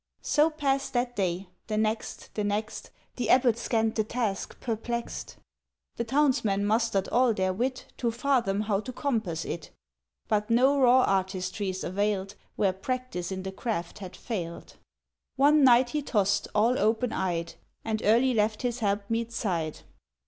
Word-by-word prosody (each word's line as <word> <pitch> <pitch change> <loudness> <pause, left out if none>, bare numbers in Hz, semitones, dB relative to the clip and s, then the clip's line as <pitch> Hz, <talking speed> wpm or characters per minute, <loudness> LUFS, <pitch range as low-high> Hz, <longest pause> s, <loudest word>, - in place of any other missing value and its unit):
'" - - -61
—So 300 +1 +3
passed 275 -3 -1
that 245 0 0
day, 185 -1 -1 0.2
the 215 - -2
next, 220 +1 -2
the 210 - -2
next; 210 +1 -3 0.3
The 240 -3 -2
abbot 250 -3 +5
scanned 225 -2 0
the 215 - +1
task, 215 -3 -3
perplexed; 235 +1 -4 0.6
The 235 - 0
townsmen 235 -6 +2
mustered 215 -2 +1
all 245 -2 +3
their 185 -1 0
wit 255 +6 -2
To 240 - 0
fathom 235 -4 +1
how 205 -2 0
to 235 +5 -6
compass 225 - -2
it, 165 - -5 0.6
But 210 0 0
no 260 +5 +4
raw 255 0 +6
artistries 190 0 -1
availed 195 +1 -1 0.2
Where 195 -2 +2
practice 195 -3 -4
in 190 0 -4
the 190 - -4
craft 190 -3 -4
had 190 -2 -8
failed... 175 -8 -6 0.6
—One 290 +2 +5
night 245 -1 +6
he 300 - -1
tossed, 205 -7 +1
all 230 +4 +3
open 225 +3 +1
eyed, 170 -2 -2 0.3
And 220 -1 -1
early 240 +5 +4
left 215 +1 0
his 245 0 -1
helpmeet's 225 +2 -1
side. 165 -6 -2
220 Hz, 155 wpm, -28 LUFS, 195-245 Hz, 0.6 s, raw